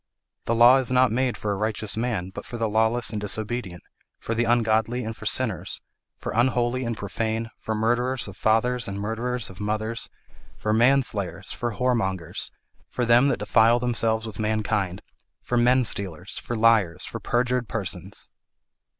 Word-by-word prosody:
'The 115 - +1
law 120 +3 +8
is 130 -2 -1
not 130 -1 +4
made 125 +1 0
for 105 - -2
a - - 0
righteous 110 0 -1
man, 110 -6 -2
but - - -7
for 120 - -7
the 115 -1 0
lawless 110 +2 +2
and 105 -2 -3
disobedient, 105 -3 -2 0.3
for 115 - -4
the 120 +1 +1
ungodly 115 +1 +2
and 110 0 -4
for - - -6
sinners, - - -1 0.4
for - - -5
unholy 120 +1 +1
and 115 -2 -3
profane, 110 +2 -3
for 110 - -3
murderers 120 +3 0
of 100 - -9
fathers 115 +3 +1
and 100 0 -4
murderers 115 +2 -2
of 95 - -14
mothers, 110 +2 -2 0.5
for 110 - -1
manslayers, 110 -6 +1
for 120 -2 -3
whoremongers, 100 -8 -1 0.4
for 125 - -1
them 120 +3 +5
that 140 - +1
defile 110 +3 +4
themselves 115 -2 0
with 110 -2 -8
mankind, 105 -3 -1 0.4
for 125 - -3
menstealers, 115 -8 +1
for 120 - -4
liars, 110 -7 +3
for - - -6
perjured 125 0 0
persons.' 105 -4 -4
115 Hz, 160 wpm, -25 LUFS, 105-120 Hz, 0.5 s, law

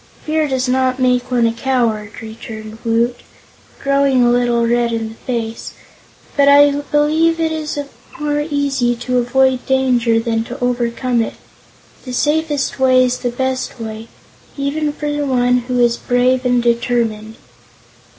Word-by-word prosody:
"Fear 310 0 +1
does 260 -2 -1
not 255 0 +1
make 250 -1 +1
one 245 -2 +2
a 230 - +1
coward," 230 -4 -1
returned 220 0 -9
Woot, 235 +1 0 0.6
growing 275 -2 +2
a 240 - +4
little 240 -1 +2
red 235 0 +1
in 225 -1 -2
the - - -10
face, 230 -1 -5 0.6
"but 280 -1 +4
I 285 0 +7
believe 295 +3 +1
it 325 -1 0
is 310 -2 -4 0.4
more 295 0 -1
easy 275 -4 0
to 250 +1 -1
avoid 260 +1 +2
danger 250 -4 +2
than 225 -1 -1
to 250 +4 -8
overcome 245 0 0
it. 225 - -4 0.7
The 255 - -7
safest 295 0 0
way 255 -1 +5
is 250 0 -1
the 245 - -2
best 260 +1 -3
way, 220 0 -7 0.5
even 295 +2 -1
for 295 0 -5 0.2
one 250 -2 +2
who 250 -1 -1
is 240 -1 +3
brave 250 +1 +1
and 245 -1 +2
determined." 230 -2 -1
250 Hz, 150 wpm, -17 LUFS, 235-275 Hz, 0.7 s, I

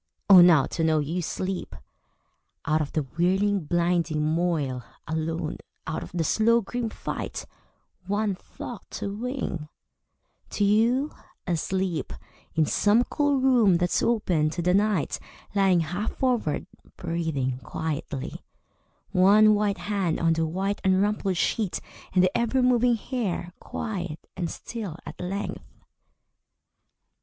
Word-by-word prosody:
Oh, 190 -3 +10
now 170 -5 +7
to 165 - -3
know 160 -1 +3
you 155 +4 -1
sleep! 185 +2 -4 0.9
Out 155 0 +2
of 145 - -3
the 155 - +1
whirling 185 +6 +1
blinding 170 -2 +1
moil, 155 -6 0 0.2
alone, 160 +1 -2 0.3
Out 160 - -3
of - - -8
the 175 -2 -1
slow 225 +8 +3
grim 235 +2 -3
fight, - - -5 0.6
One 205 +1 0
thought 215 +4 -9
to 200 - -3
wing 225 - -4 0.8
to 205 - -1
you, 235 +8 +3 0.3
asleep, 180 0 -1 0.4
In 160 -1 +3
some 210 +9 +3
cool 290 0 +1
room 245 -8 +5
that's 175 0 +1
open 180 -10 +2
to 170 +2 -3
the 180 +1 +3
night 205 -4 +1 0.3
Lying 195 -3 +4
half 175 +7 -3
forward, 240 - 0 0.3
breathing 160 -7 -2
quietly, 145 +1 -4 0.7
One 210 +4 +6
white 205 -1 +1
hand 195 -5 -1
on 165 -1 +3
the 165 0 0
white 195 +5 -2
Unrumpled 195 0 +2
sheet, 205 +2 0 0.3
and 185 -1 +4
the 185 - +2
ever 235 +2 +2
moving 245 -1 +4
hair 205 -7 -3
Quiet 180 -8 -4 0.2
and 175 -2 -2
still 210 -9 -6
at - - -9
length! 195 +3 -5
185 Hz, 130 wpm, -26 LUFS, 160-210 Hz, 0.9 s, Oh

